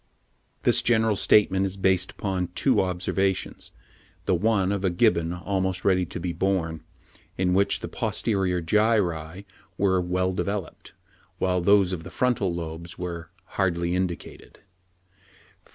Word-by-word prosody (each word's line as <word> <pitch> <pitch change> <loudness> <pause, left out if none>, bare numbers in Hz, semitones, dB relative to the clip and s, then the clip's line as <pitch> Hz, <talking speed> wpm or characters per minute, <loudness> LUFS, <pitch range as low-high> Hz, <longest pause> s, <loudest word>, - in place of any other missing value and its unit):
This - - +5
general 110 -2 +2
statement 95 -1 +3
is 95 0 -3
based 95 -1 +2
upon 95 -3 -2
two - - +3
observations, 95 +1 -1 0.5
the - - +2
one 100 +1 +2
of 100 -1 -2
a 95 - +3
Gibbon 85 -3 +2
almost 95 +1 -2
ready 95 -2 +3
to - - -6
be 90 0 -3
born, 85 -3 -1 0.5
in 90 -1 +1
which 100 +2 +2
the - - -4
posterior 95 -5 -1
gyri 95 -3 +1 0.3
were 95 -2 +2
"well 90 +1 0
developed," 100 -2 -4 0.4
while 90 -1 +1
those 95 0 +4
of 85 -3 -5
the 95 - -8
frontal 115 -7 0
lobes 85 0 -6
were 85 -3 -5 0.2
"hardly 85 -3 -1
indicated" 90 -2 -4 1.1
(77. - - -26
95 Hz, 135 wpm, -25 LUFS, 85-100 Hz, 1.1 s, This